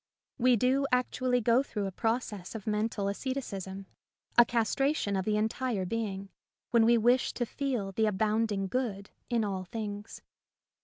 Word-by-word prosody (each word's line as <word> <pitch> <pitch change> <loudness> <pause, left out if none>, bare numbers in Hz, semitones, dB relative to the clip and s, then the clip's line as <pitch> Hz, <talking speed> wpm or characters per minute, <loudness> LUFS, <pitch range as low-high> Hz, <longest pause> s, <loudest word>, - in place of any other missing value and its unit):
We 250 0 +5
do 260 +4 +2
actually 250 0 +1
go 235 +3 +4
through 210 -7 -3
a 195 - -3
process 220 -2 -2
of 215 - -6
mental 210 -1 -1
asceticism, 200 -5 -4 0.5
a 240 - +9
castration 235 0 0
of 190 -1 -1
the 210 -1 +1
entire 220 -1 -1
being, 200 -1 -3 0.4
when 230 -2 +5
we 235 +1 +5
wish 240 +3 +3
to 240 - -1
feel 240 -6 -2
the 220 +3 +1
abounding 210 0 +1
good 200 -2 -3 0.2
in 235 -2 +1
all 195 -3 -2
things. 205 +1 -6
220 Hz, 150 wpm, -30 LUFS, 200-245 Hz, 0.5 s, a